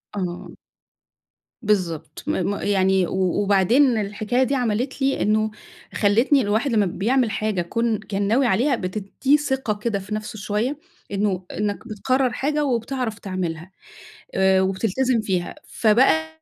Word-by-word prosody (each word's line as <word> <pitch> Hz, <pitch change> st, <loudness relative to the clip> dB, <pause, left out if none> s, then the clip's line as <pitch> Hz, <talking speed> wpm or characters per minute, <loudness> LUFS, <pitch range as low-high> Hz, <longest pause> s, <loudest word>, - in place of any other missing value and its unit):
آه. 180 Hz, -3 st, -5 dB, 1.1 s
بالضبط 180 Hz, -8 st, -1 dB
م -, -, +1 dB, 0.2 s
م -, -, -2 dB
يعني 190 Hz, -2 st, +2 dB
و -, -, -6 dB, 0.3 s
وبعدين 225 Hz, +6 st, +4 dB
الحكاية 215 Hz, +4 st, 0 dB
دي 270 Hz, +2 st, 0 dB
عملِت 250 Hz, +2 st, -1 dB
لي 270 Hz, 0 st, +1 dB
إنه 215 Hz, +1 st, +1 dB, 0.4 s
خلِّتني 230 Hz, +7 st, +3 dB
الواحد 220 Hz, +6 st, 0 dB
لمّا 215 Hz, -3 st, +3 dB
بيعمل 225 Hz, +6 st, +1 dB
حاجة 210 Hz, -2 st, -1 dB
كون 225 Hz, +5 st, -1 dB
كان 200 Hz, -1 st, -3 dB
ناوي 250 Hz, +5 st, +3 dB
عليها، 245 Hz, +6 st, +2 dB
بتِدّيه 215 Hz, +8 st, 0 dB
ثقة 265 Hz, -6 st, -1 dB
كده 210 Hz, -1 st, -2 dB
في 205 Hz, +2 st, -5 dB
نفسه 215 Hz, 0 st, -6 dB
شويّة، 215 Hz, +7 st, -1 dB, 0.3 s
إنه 195 Hz, -2 st, -1 dB
إنّك 210 Hz, +2 st, -3 dB
بتقرر 255 Hz, +4 st, 0 dB
حاجة، 295 Hz, +1 st, 0 dB
وبتعرف 240 Hz, -2 st, -2 dB
تعملها 180 Hz, -2 st, -4 dB, 0.6 s
آآ 190 Hz, 0 st, +4 dB
وبتلتزم 225 Hz, +6 st, 0 dB
فيها. 185 Hz, -4 st, -2 dB
فبقى 160 Hz, -9 st, +2 dB
210 Hz, 135 wpm, -22 LUFS, 190-250 Hz, 1.1 s, وبعدين